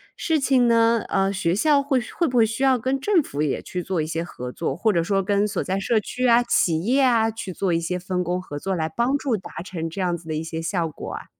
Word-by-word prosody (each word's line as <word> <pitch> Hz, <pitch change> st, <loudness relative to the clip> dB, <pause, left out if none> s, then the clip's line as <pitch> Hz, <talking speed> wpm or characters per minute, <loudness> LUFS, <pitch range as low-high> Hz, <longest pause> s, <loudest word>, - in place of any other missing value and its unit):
事 320 Hz, -2 st, 0 dB
情 265 Hz, -3 st, +3 dB
呢， 230 Hz, -1 st, +4 dB
呃， 195 Hz, +1 st, +1 dB
学 175 Hz, -3 st, 0 dB
校 290 Hz, +6 st, +3 dB
会 275 Hz, -2 st, +1 dB
会 250 Hz, +8 st, -2 dB
不 250 Hz, -3 st, -1 dB
会 230 Hz, -, +6 dB
需 225 Hz, +4 st, -4 dB
要 265 Hz, -1 st, +4 dB
跟 260 Hz, +3 st, -1 dB
政 355 Hz, +2 st, +2 dB
府 145 Hz, -, -4 dB
也 150 Hz, -2 st, -1 dB
去 180 Hz, -, -4 dB
做 185 Hz, -1 st, -2 dB
一 155 Hz, -, 0 dB
些 165 Hz, +1 st, -3 dB
合 125 Hz, -7 st, -7 dB
作， 165 Hz, -, -3 dB
或 215 Hz, +5 st, +1 dB
者 170 Hz, -, +2 dB
说 195 Hz, +2 st, 0 dB
跟 200 Hz, +2 st, +1 dB
所 210 Hz, -, -2 dB
在 190 Hz, +1 st, -1 dB
社 220 Hz, +3 st, +1 dB
区 250 Hz, +4 st, -2 dB
啊、 235 Hz, 0 st, +5 dB
企 165 Hz, -8 st, +1 dB
业 255 Hz, +7 st, +2 dB
啊， 230 Hz, -3 st, +3 dB
去 215 Hz, -3 st, -6 dB
做 185 Hz, 0 st, -1 dB
一 165 Hz, -, +2 dB
些 170 Hz, +2 st, -2 dB
分 180 Hz, 0 st, -2 dB
工 180 Hz, +1 st, -1 dB
合 145 Hz, -5 st, -7 dB
作， 190 Hz, +5 st, -2 dB
来 160 Hz, -2 st, -1 dB
帮 240 Hz, -, 0 dB
助 270 Hz, -4 st, -1 dB
达 180 Hz, -4 st, -7 dB
成 165 Hz, -3 st, -5 dB
这 165 Hz, -, -8 dB
样 175 Hz, -2 st, 0 dB
子 170 Hz, -1 st, -11 dB
的 155 Hz, -, -3 dB
一 155 Hz, -, -2 dB
些 160 Hz, 0 st, -5 dB
效 170 Hz, 0 st, -1 dB
果 155 Hz, -, -8 dB
啊？ -, -, -7 dB
195 Hz, 295 characters per minute, -23 LUFS, 170-240 Hz, -, 会